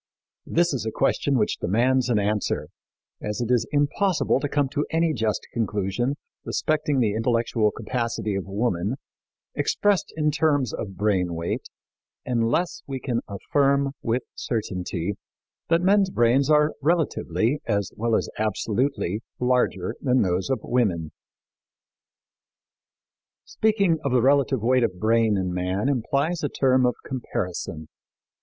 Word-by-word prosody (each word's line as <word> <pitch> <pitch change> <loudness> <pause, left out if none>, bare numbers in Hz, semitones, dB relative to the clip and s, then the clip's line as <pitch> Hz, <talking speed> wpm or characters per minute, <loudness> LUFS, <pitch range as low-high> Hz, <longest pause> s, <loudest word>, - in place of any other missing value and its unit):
This 170 -1 +2
is 130 - -2
a 110 - -2
question 140 +4 +1
which 105 - 0
demands 125 +6 +2
an 120 - +3
answer, 105 0 -1 0.5
as 105 0 -3
it 120 0 -1
is 120 -2 +2
impossible 150 +2 +1
to 145 - -2
come 145 -1 +1
to 145 +1 -1
any 165 0 +1
just 110 -5 -1
conclusion 110 +4 -1 0.3
respecting 150 -3 0
the 110 -4 +2
intellectual 115 -1 +1
capacity 115 0 -3
of 95 -1 -3
woman 100 +1 -1 0.6
expressed 205 -4 +1
in 150 -1 +2
terms 145 -5 +1
of 100 -3 -5
brain 95 -5 +1
weight, 85 +1 -3 0.6
unless 120 +8 0
we 135 -1 -4
can 120 -2 -1
affirm 140 +7 +1
with 120 +2 0
certainty 95 -4 -3 0.5
that 165 +1 +3
men's 195 0 +4
brains 125 0 +3
are 150 0 +4
relatively, 150 -4 +1
as 100 -4 0
well 115 +1 +1
as - - 0
absolutely, 110 0 -1 0.2
larger 125 -7 +1
than 130 -1 +3
those 90 +2 -1
of 130 -5 0
women. 90 -11 0 2.3
Speaking 200 -7 +1
of 140 - 0
the 125 -1 +3
relative 135 -3 +3
weight 125 +1 +3
of 95 -6 -1
brain 110 -1 +3
in 90 -1 -1
man 90 +6 -1
implies 140 +5 0
a 145 - -1
term 130 -1 +3
of 125 - 0
comparison. 90 - -4
120 Hz, 135 wpm, -24 LUFS, 105-140 Hz, 2.3 s, men's